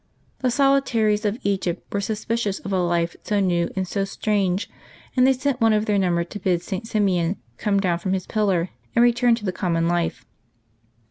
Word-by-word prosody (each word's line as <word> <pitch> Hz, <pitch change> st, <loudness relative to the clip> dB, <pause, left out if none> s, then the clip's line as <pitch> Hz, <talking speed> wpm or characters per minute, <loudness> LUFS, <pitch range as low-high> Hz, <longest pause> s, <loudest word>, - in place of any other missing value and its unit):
The 255 Hz, -, +1 dB
solitaries 240 Hz, -6 st, +2 dB
of 210 Hz, +2 st, 0 dB
Egypt 190 Hz, -3 st, -2 dB
were 200 Hz, -, +1 dB
suspi 215 Hz, +2 st, -2 dB
cious 205 Hz, -4 st, -1 dB
of 200 Hz, -, -4 dB
a 190 Hz, -, +2 dB
life 170 Hz, -1 st, 0 dB
so 210 Hz, -1 st, 0 dB
new 175 Hz, -3 st, +1 dB
and 190 Hz, -1 st, -1 dB
so 195 Hz, +2 st, -1 dB
strange, 195 Hz, -1 st, 0 dB, 0.5 s
and 255 Hz, 0 st, +5 dB
they 265 Hz, -, +5 dB
sent 260 Hz, -1 st, -2 dB
one 225 Hz, -1 st, +5 dB
of 210 Hz, 0 st, +1 dB
their 205 Hz, -2 st, +2 dB
number 175 Hz, -2 st, +1 dB
to 180 Hz, +4 st, -8 dB
bid 180 Hz, -2 st, 0 dB
St. 195 Hz, +5 st, -5 dB
Simeon 190 Hz, -5 st, +1 dB, 0.2 s
come 200 Hz, -1 st, +1 dB
down 175 Hz, -3 st, 0 dB
from 190 Hz, +2 st, -2 dB
his 185 Hz, -1 st, -2 dB
pillar 190 Hz, -5 st, 0 dB, 0.2 s
and 235 Hz, -, +5 dB
return 240 Hz, 0 st, +4 dB
to 220 Hz, -2 st, -8 dB
the 185 Hz, -, 0 dB
common 165 Hz, -3 st, 0 dB
life. 175 Hz, -1 st, -1 dB
200 Hz, 200 wpm, -23 LUFS, 180-220 Hz, 0.5 s, and